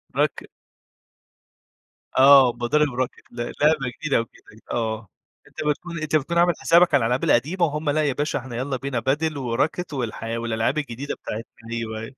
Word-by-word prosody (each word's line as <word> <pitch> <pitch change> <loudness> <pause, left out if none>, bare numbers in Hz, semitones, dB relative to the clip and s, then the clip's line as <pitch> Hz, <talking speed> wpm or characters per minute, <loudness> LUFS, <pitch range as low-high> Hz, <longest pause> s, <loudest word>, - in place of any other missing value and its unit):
راك - - 0 1.7
آه. 135 -2 +8
مضارب 145 +3 +2
راكِت 125 0 -3
ل - - -17
لعبة 150 +6 +2 0.2
جديدة 155 -3 +1
أو 115 - 0
كده، 110 -1 -20
آه. 110 -2 -2 0.4
أنت - - -24
بتكون 170 +3 -3
أنت 155 0 -1
بتكون 155 +3 0
عامِل 175 0 +4
حسابك 170 +1 +4
على 140 - +5
الألعاب 120 +3 0
القديمة 165 +9 +2
وهُم، 150 0 -2
لأ، 155 +2 +2
يا 140 -3 +1
باشا 145 +3 -1
إحنا 125 -2 -8
يالّا 130 +2 -2
بينا 135 -1 -3
padel 145 +5 0
وراكِت 140 +7 -1
والحي 115 -3 -3
والألعاب 115 +4 -1
الجديدة 140 -2 -4
بتاعتنا 115 +1 -8
أيوه، 110 -1 -4
أيوه. 110 +4 -9
135 Hz, 170 wpm, -23 LUFS, 115-150 Hz, 1.7 s, آه